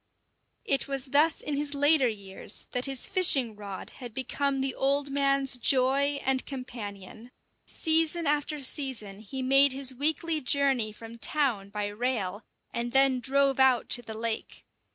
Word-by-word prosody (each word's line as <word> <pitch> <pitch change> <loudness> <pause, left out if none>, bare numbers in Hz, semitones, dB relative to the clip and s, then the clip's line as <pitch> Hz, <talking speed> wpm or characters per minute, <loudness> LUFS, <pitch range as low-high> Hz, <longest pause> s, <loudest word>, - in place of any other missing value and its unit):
It 275 - +3
was 275 -1 -1
thus 290 +4 +2
in 295 - -3
his 290 0 0
later 285 -1 +4
years 200 -2 -5
that 250 0 -1
his 270 -2 -2
fishing 280 - +3
rod 200 -2 -8
had 240 -3 -9
become 270 +1 -2
the 265 -1 -1
old 280 +1 0
man's 275 -1 +1
joy 275 +3 +1
and 265 0 +1
companion. 225 -4 -9 0.4
Season 325 +1 +2
after 295 +1 -1
season 255 -8 -3
he 260 +5 -6
made 275 +1 +5
his 265 -1 -3
weekly 315 +4 0
journey 265 -5 +1
from 225 +2 -12
town 240 -9 0
by 210 0 -4
rail, 205 -2 -3 0.3
and 235 0 -3
then 270 -1 +4
drove 270 +2 +1
out 260 -2 +3
to 245 - +4
the 220 -2 -8
lake. 225 0 -4
265 Hz, 155 wpm, -27 LUFS, 230-280 Hz, 0.4 s, made